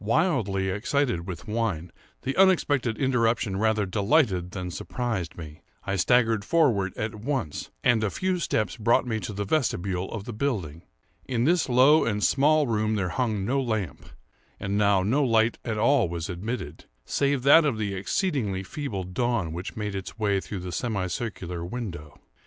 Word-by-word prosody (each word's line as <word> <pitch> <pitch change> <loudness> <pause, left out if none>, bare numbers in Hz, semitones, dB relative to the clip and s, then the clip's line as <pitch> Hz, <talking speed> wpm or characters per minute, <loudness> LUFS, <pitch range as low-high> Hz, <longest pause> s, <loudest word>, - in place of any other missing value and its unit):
Wildly 110 - +1
excited 105 -2 -1
with 85 -2 -7
wine, 105 -7 -2 0.3
the 135 - -2
unexpected 145 - +3
interruption 115 -6 +1
rather 110 0 +2
delighted 100 - +1
than 90 -1 -5
surprised 115 -3 -4
me. 80 -2 -9 0.2
I 100 - -2
staggered 115 +1 +3
forward 100 - +2
at 110 0 -2
once, 110 - -3
and 120 -3 +3
a 105 - +1
few 185 - -1
steps 110 -9 -1
brought 115 +3 +3
me 110 -3 -1
to 105 - -5
the 100 0 -3
vestibule 95 - -1
of 110 -3 -5
the 120 - -7
building. 100 - -2 0.5
In 120 -3 0
this 170 +1 +2
low 130 +5 +6
and 105 -2 -1
small 150 +2 +4
room 110 -2 0
there 95 -3 -1
hung 110 0 -1
no 135 +5 +1
lamp; 110 - -3 0.5
and 100 0 -2
now 100 -2 +3
no 130 +9 +2
light 115 -2 +2
at 115 -3 -3
all 115 -2 +3
was 85 -1 -4
admitted, 90 - -5 0.2
save 140 -2 0
that 155 +4 +7
of 140 -7 0
the 105 -2 -2
exceedingly 100 - -1
feeble 110 -4 -4
dawn 95 -2 -1
which 90 +3 -6
made 105 -2 -3
its 95 +2 -6
way 100 -3 +1
through 95 -2 -6
the 90 0 -6
semi 105 -3 -2
circular 90 -3 -4
window. 85 - -6
110 Hz, 170 wpm, -26 LUFS, 95-125 Hz, 0.5 s, that